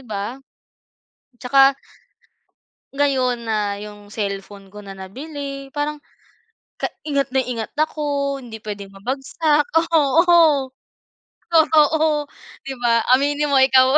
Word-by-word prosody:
ba? 210 +3 -4 1.0
Tsaka 270 +2 +4 1.2
ngayon 260 -4 +1
na 210 -3 -1
yung 205 -1 -11
cellphone 200 -1 -6
ko 210 - -10
na 200 -1 -10
nabili 275 +7 -7
parang 295 +1 -2 0.8
ka - - 0 0.2
ingat 280 -3 0
na 265 - +3
ingat 235 -3 -5
ako. 285 -2 -1
Hindi 225 -4 -10
pwedeng 200 -2 -7
mabagsak, 280 +7 0 0.2
oo, 315 -2 +4 0.8
totoo, 310 -2 +3 0.3
di 270 - -6
ba? 235 -1 +2
Aminin 290 +2 0
mo 280 - +3
ikaw. 265 +1 +5
270 Hz, 105 wpm, -21 LUFS, 220-295 Hz, 1.2 s, ikaw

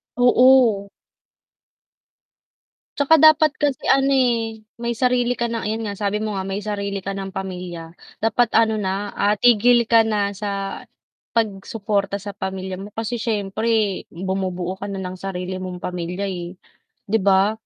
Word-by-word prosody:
Oo. 245 -4 +5 2.1
'Tsaka 285 +3 +5
dapat 310 -1 +7
kasi 285 -2 -1
ano, 275 0 +4
eh, 235 -4 +1 0.2
may 235 0 -3
sarili 245 +1 +1
ka 235 - +1
ng 230 -1 -3
ayun 220 +2 -2
nga, 200 - -4
sabi 205 +1 -1
mo 215 -2 -3
nga, 190 - -2
may 195 +1 -3
sarili 200 -1 -3
ka 195 +1 -5
ng 195 0 -5
pamilya. 180 -3 -6 0.2
Dapat 225 +2 +1
ano 220 -1 +3
na, 200 0 -3
ah, 205 +1 +2
tigil 240 +1 +5
ka 230 -1 +5
na 205 -2 -1
sa 195 -1 -4 0.5
pag-suporta 200 -2 -1
sa 200 0 -8
pamilya 190 0 -4
mo, 195 +3 -9
kasi 225 +2 -3
siyempre, 215 -1 -1
bumubuo 185 0 -3
ka 200 +1 -6
na 195 - -4
ng 185 0 -5
sarili 185 -1 -5
mong 185 -1 -6
pamilya, 180 +2 -4
eh, 180 -1 -6 0.4
'di 220 +3 0
ba? 195 +1 +3
205 Hz, 150 wpm, -21 LUFS, 190-230 Hz, 2.1 s, dapat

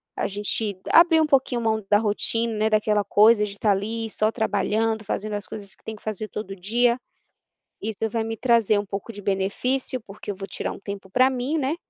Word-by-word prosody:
a - - -1
gente 205 0 -2 0.2
abrir 335 -1 +7
um - - +3
pouquinho 265 -4 +2
mão 220 -1 0
da 205 - +6
rotina, 225 +2 0
né, 215 0 +1
daquela 215 -1 +2
coisa 210 +1 +5
de 210 - -2
estar 205 +1 +1
ali 220 +3 -2
só 215 +1 +2
trabalhando, 220 0 0
fazendo 215 0 -3
as 205 -1 -4
coisas 200 -2 -8
que - - -32
tem 220 - -6
que 210 - -18
fazer 215 0 -3
todo 195 -2 -6
dia, 235 +6 +1 0.8
isso 220 +1 -2
vai 225 +1 -1
me 225 0 -4
trazer 230 -4 +3
um 205 - -4
pouco 200 +4 -6
de 205 - -9
benefício, 205 +7 0
porque 205 0 -8
eu - - -6
vou 195 0 -7
tirar - - -4
um - - -9
tempo 200 -1 -7
para 255 +3 +4
mim, 260 +4 -2
né, 285 +1 0
215 Hz, 210 wpm, -24 LUFS, 205-230 Hz, 0.8 s, abrir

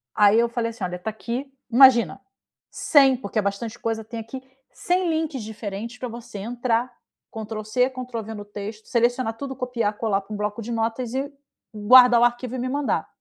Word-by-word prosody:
Aí 210 +1 +5
eu 235 0 +2
falei 235 -1 -2
assim: 225 -3 -9
"Olha 180 0 -3
tá 220 - -4
aqui, 240 +5 -5 0.2
imagina, 260 0 +6 0.5
100, 270 -4 +4
porque 215 -2 -3
é - - +3
bastante 200 +3 -3
coisa 225 -1 -2
tem 230 +1 -7
aqui. 225 +4 -7 0.3
100 360 -1 0
links 315 -7 -2
diferentes 220 +2 -6
pra 250 - -5
você 230 -3 -9
entrar, 240 +2 -1 0.4
control 220 -1 -6
c, 250 +4 +2
control 255 -3 -6
v, 220 +2 -7
no 205 -1 -8
texto. 210 +1 -8
Selecionar 240 0 +1
tudo, 275 -1 -5
copiar, 245 -5 -1
colar 205 -3 0
para 205 +2 -10
um 210 - -4
bloco 210 +2 -3
de 235 +2 -6
notas 230 +1 -2
e 275 +2 -2 0.4
guardar 240 +3 +7
o - - +6
arquivo 240 +1 0
e 255 - -3
me 255 - -2
mandar." 285 +1 -1
235 Hz, 195 wpm, -24 LUFS, 215-255 Hz, 0.5 s, guardar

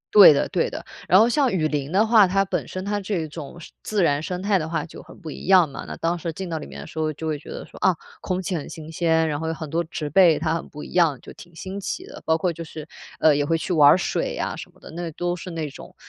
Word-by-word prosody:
对 205 -5 +11
的 140 - +1
对 - - 0
的。 - - -7 0.2
然 185 - +6
后 225 - +6
像 265 +1 +2
雨 160 -5 +1
林 145 -1 -3
的 200 +4 +4
话， 220 -3 +6
它 195 +2 +2
本 - - -2
身 185 +1 -6
它 205 0 -1
这 200 +1 -3
一 160 - -4
种 155 +1 -9
生 170 - -12
自 210 -3 0
然 145 -3 +2
生 180 +3 -4
态 200 -1 +2
的 160 -1 -4
话 165 - -2
就 170 - -11
很 - - -15
不 165 -5 -7
一 - - -9
样 185 -3 +6
嘛， 140 - -8
那 - - -6
当 170 +1 -1
时 165 +1 -3
进 185 +4 -6
到 165 -2 -3
里 - - -8
面 70 0 -10
的 70 - -8
时 160 - -8
候 155 0 0
就 160 - -7
会 155 -2 -2
觉 - - -14
得 - - -7
说， - - -14
啊， 185 - +3 0.3
空 185 -1 -2
气 185 0 -3
很 155 - -5
新 160 0 -9
鲜， 160 -1 +2
然 145 -2 -2
后 160 - -3
有 160 - -1
很 155 - -6
多 170 +1 +1
植 150 -2 -5
被 175 -2 +6
它 160 0 0
很 165 - -4
不 150 - -9
一 - - -10
样， 165 -7 +3
就 - - -12
挺 175 -1 -15
新 190 +4 -6
奇 195 - -4
的。 - - -11
包 160 - +3
括 175 +1 0
就 165 +1 -7
是， 155 -1 -9 0.3
呃， 155 -2 +5
也 145 - +1
会 165 +3 +1
去 170 - -3
玩 150 -3 +7
儿 - - +7
水 185 - -2
呀 - - -3
什 - - -9
么 - - -25
的， - - -12
那 170 +1 -5
都 175 +2 -2
是 180 +1 -8
那 165 -3 -3
种， - - -12
165 Hz, 330 characters per minute, -23 LUFS, 155-185 Hz, 0.3 s, 对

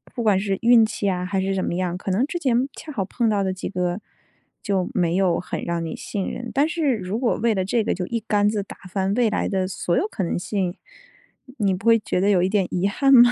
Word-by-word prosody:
不 240 - -2
管 205 -4 +3
是 195 -1 -1
运 235 -1 +6
气 215 -2 -3
啊， 180 -1 -1
还 190 +1 -1
是 195 +1 -1
怎 190 - -1
么 - - -2
样， 180 -1 -1
可 195 - -6
能 210 +8 +2
之 345 +4 -4
前 255 -4 +1
恰 310 - -8
好 200 -9 -2
碰 230 +3 0
到 205 -2 +1
的 190 -1 -1
几 185 - -5
个， 180 0 -1 0.6
就 195 -3 0
没 175 -4 +1
有 185 -3 +2
很 175 - -5
让 170 -1 -2
你 160 - -4
信 200 -2 -4
任， 240 -1 -6
但 285 +3 +3
是 305 -5 +1
如 195 +3 -3
果 245 -2 +1
为 230 -1 +2
了 190 -2 -1
这 225 +3 +1
个， - - 0
就 180 -1 -4
一 230 -1 -2
竿 205 -1 +2
子 210 -2 -1
打 - - -11
翻 190 +1 0
未 240 -2 +3
来 210 - -1
的 190 -1 0
所 175 -1 -1
有 405 - +1
可 210 - -4
能 175 - -1
性。 185 -1 -2 0.8
你 200 -2 +2
不 185 +3 -6
会 230 - +7
觉 205 - -2
得 200 - +3
有 190 -3 +4
一 185 - +2
点 200 -2 +2
遗 180 +2 +1
憾 275 +6 +3
吗？ 245 -1 +8
200 Hz, 285 characters per minute, -23 LUFS, 185-230 Hz, 0.8 s, 吗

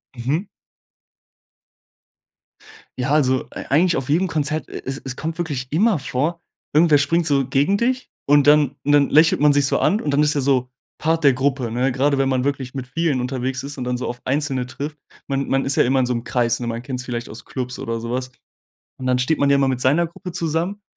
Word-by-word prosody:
Mhm. 145 - -2 2.5
Ja, 130 +3 -1
also, 130 -4 +2
ei - - -8
eigentlich 170 +5 +3
auf 135 - -3
jedem 175 +6 +2
Konzert, 155 -1 -1
e - - -7
es 135 +1 -4
es 130 - -4
kommt 160 +3 -4
wirklich 145 -7 -3
immer 190 +2 +2
vor, 150 +6 -2 0.3
irgendwer 155 -1 +5
springt 160 +4 +1
so 140 -3 +2
gegen 140 +9 +2
dich 255 +3 -1 0.2
und 145 0 +4
dann 145 -2 +5
dann 145 -1 +3
lächelt 155 +3 +5
man 145 0 +5
sich 140 -1 +3
so - - +1
an 210 - +2
und 150 - -3
dann 145 +2 +3
ist 150 - +2
er 145 - 0
so 130 -2 +1 0.3
Part 160 0 0
der 140 - +6
Gruppe, 130 -1 -1
ne, 125 +4 0
grade 140 +2 +1
wenn 135 - +2
man 130 -1 0
wirklich 135 -2 -2
mit 130 -2 -5
vielen 155 -2 0
unterwegs 130 0 -3
ist 140 +1 -7
und 130 - -4
dann 125 0 -2
so 125 - -4
auf 120 - -5
einzelne 135 -2 -1
trifft. 145 +4 -6 0.3
Man 140 0 -1
man 135 0 +1
ist 140 - 0
ja 155 - +4
immer 130 +2 +2
in 125 - +1
so 125 - 0
'nem 115 -1 -3
Kreis, 120 -2 0
ne? 120 - -4
Man 115 0 -3
kennt's 125 -1 -5
vielleicht 120 -1 -5
aus 110 - -9
Clubs 125 -1 -5
oder 115 0 -3
sowas. 125 +2 -4 0.7
Und 130 - -5
dann 125 0 +2
steht 135 +5 +1
man 140 - +2
ja 140 - +5
immer 135 -1 +2
mit 130 -1 -1
seiner 155 +7 +3
Gruppe 180 +2 -9
zusammen 170 +4 -2
140 Hz, 225 wpm, -21 LUFS, 130-155 Hz, 2.5 s, der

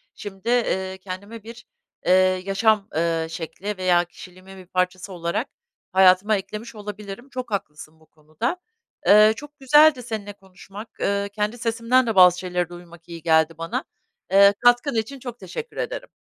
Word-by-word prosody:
şimdi, 200 +2 -7
eee, 190 -6 0
kendime 200 +4 -9
bir, 230 +2 -12 0.4
eee, - - +2 0.3
yaşam, 200 +1 +2
eee, 165 0 0
şekli 185 +5 -6
veya 180 -1 +2
kişiliğimin 185 +2 -14
bir 185 - -12
parçası 185 +1 -2
olarak 170 +8 -3 0.4
hayatıma 190 +2 +5
eklemiş 215 +4 -8
olabilirim. 210 +3 -8
Çok 255 -3 -6
haklısın 155 -5 -6
bu 160 - -23
konuda. 155 - -5 0.5
Eee, 215 +1 +7
çok 295 +3 -12
güzeldi 295 0 +5
seninle 215 -3 -6
konuşmak. 195 +2 -12
Eee, 200 0 -1
kendi 210 +3 -2
sesimden 235 +2 +1
de 225 - -1
bazı 180 -1 +7
şeyleri 180 -1 -2
duymak 175 -1 -14
iyi 170 -1 -8
geldi 160 0 +3
bana. 165 0 -3 0.5
Eee, 200 +1 +7
katkın 245 +2 +3
için 230 +5 -3
çok 245 -1 -8
teşekkür 190 - -8
ederim. - - -4
200 Hz, 150 wpm, -23 LUFS, 180-230 Hz, 0.5 s, Eee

